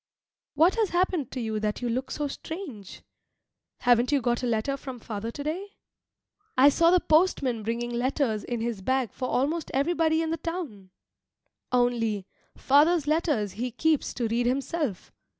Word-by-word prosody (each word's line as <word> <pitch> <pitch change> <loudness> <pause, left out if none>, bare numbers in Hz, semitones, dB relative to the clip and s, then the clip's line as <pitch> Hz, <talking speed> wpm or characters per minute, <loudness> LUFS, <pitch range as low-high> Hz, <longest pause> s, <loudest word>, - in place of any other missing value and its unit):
What 330 +6 +5
has 440 -4 +2
happened 350 -6 0
to 260 - -5
you 220 -2 -2
that 210 +3 -2
you - - 0
look 255 +3 -2
so 295 -1 -2
strange? 280 - -8 0.8
Haven't 245 +1 +3
you 285 - +3
got 240 0 0
a 250 - -1
letter 235 +4 0
from 265 -2 -8
father 220 0 -5
to 285 +5 -6
day? 370 +7 -5 0.8
I 270 +3 +8
saw 335 +4 +4
the 365 +1 +5
postman 305 -9 +2
bringing 235 +2 -3
letters 240 -3 0
in 240 -2 -3
his 230 -4 -3
bag 260 +1 0
for 255 - -3
almost 305 +5 0
everybody 320 +2 +2
in 320 - -2
the 330 - -1
town. 300 - -6 0.8
Only, 235 -5 +1 0.3
father's 295 +3 +4
letters 300 - +1
he 235 +6 -3
keeps 310 +5 +1
to 240 -2 -1
read 235 +2 0
himself. 270 - -2
260 Hz, 165 wpm, -27 LUFS, 230-315 Hz, 0.8 s, I